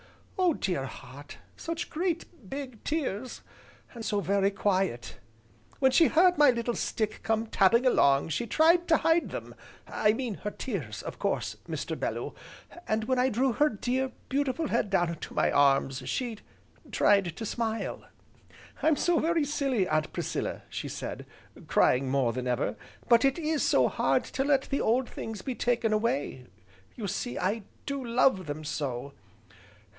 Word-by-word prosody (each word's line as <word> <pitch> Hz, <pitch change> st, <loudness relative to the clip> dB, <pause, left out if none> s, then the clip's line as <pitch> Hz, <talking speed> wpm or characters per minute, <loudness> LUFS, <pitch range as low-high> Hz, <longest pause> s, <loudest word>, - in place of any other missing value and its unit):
Oh 355 Hz, -5 st, +3 dB
dear 175 Hz, -8 st, -1 dB
heart! 140 Hz, +3 st, -11 dB, 0.2 s
such 330 Hz, +1 st, -5 dB
great, 335 Hz, -, -3 dB
big 265 Hz, -5 st, -7 dB
tears, 260 Hz, -6 st, -3 dB, 0.5 s
and 235 Hz, -2 st, -7 dB
so 210 Hz, -2 st, 0 dB
very 195 Hz, +1 st, +2 dB
quiet! 190 Hz, -10 st, -1 dB, 0.6 s
When 265 Hz, -1 st, +4 dB
she 325 Hz, +5 st, +6 dB
heard 355 Hz, 0 st, +4 dB
my 295 Hz, -2 st, +8 dB
little 240 Hz, -1 st, 0 dB
stick 215 Hz, -2 st, -2 dB
come 225 Hz, 0 st, 0 dB
tapping 225 Hz, +3 st, +3 dB
along 140 Hz, -, +4 dB
she 170 Hz, +10 st, -2 dB
tried 335 Hz, -, +4 dB
to 320 Hz, -, +5 dB
hide 330 Hz, +1 st, +2 dB
them, -, -, -7 dB, 0.3 s
I 210 Hz, 0 st, +2 dB
mean 235 Hz, -3 st, -3 dB
her 210 Hz, -, -1 dB
tears, -, -, -5 dB
of -, -, -7 dB
course, -, -, -1 dB
Mr. -, -, -3 dB
Bellew, -, -, -3 dB, 0.5 s
and 220 Hz, 0 st, 0 dB
when 255 Hz, +3 st, 0 dB
I 255 Hz, +1 st, +3 dB
drew 255 Hz, +2 st, +1 dB
her 300 Hz, +6 st, +3 dB
dear, 255 Hz, +3 st, -1 dB, 0.2 s
beautiful 285 Hz, +3 st, -1 dB
head 230 Hz, -3 st, +1 dB
down 175 Hz, -3 st, +2 dB
into 170 Hz, -, -7 dB
my -, -, +2 dB
arms, 135 Hz, -1 st, +3 dB
she 235 Hz, -4 st, -2 dB, 0.5 s
tried 195 Hz, -5 st, +3 dB
to 225 Hz, -, -4 dB
smile. 225 Hz, 0 st, -3 dB, 0.8 s
'I'm 315 Hz, 0 st, +4 dB
so 345 Hz, +2 st, +2 dB
very 330 Hz, -2 st, +1 dB
silly, 270 Hz, -9 st, 0 dB
Aunt 155 Hz, -2 st, 0 dB
Priscilla,' -, -, -3 dB
she -, -, -5 dB
said, -, -, -6 dB, 0.4 s
crying 130 Hz, +1 st, +3 dB
more 130 Hz, -3 st, +1 dB
than 125 Hz, +1 st, -3 dB
ever, 125 Hz, +2 st, 0 dB, 0.3 s
'but 235 Hz, 0 st, +5 dB
it 275 Hz, +2 st, +3 dB
is 315 Hz, -2 st, 0 dB
so -, -, +4 dB
hard -, -, +1 dB
to 270 Hz, -, -2 dB
let 275 Hz, -1 st, +3 dB
the 280 Hz, -, -2 dB
old 245 Hz, +3 st, +2 dB
things 220 Hz, -4 st, -7 dB
be 260 Hz, -, -2 dB
taken 235 Hz, -1 st, +1 dB
away, 145 Hz, -, -1 dB, 0.5 s
you 215 Hz, -4 st, -4 dB
see, 245 Hz, +6 st, -3 dB
I 200 Hz, +5 st, 0 dB, 0.2 s
do 280 Hz, -2 st, -3 dB
love 235 Hz, -6 st, +2 dB
them 145 Hz, +1 st, -5 dB
so! 140 Hz, -3 st, -4 dB
230 Hz, 160 wpm, -28 LUFS, 185-275 Hz, 0.8 s, my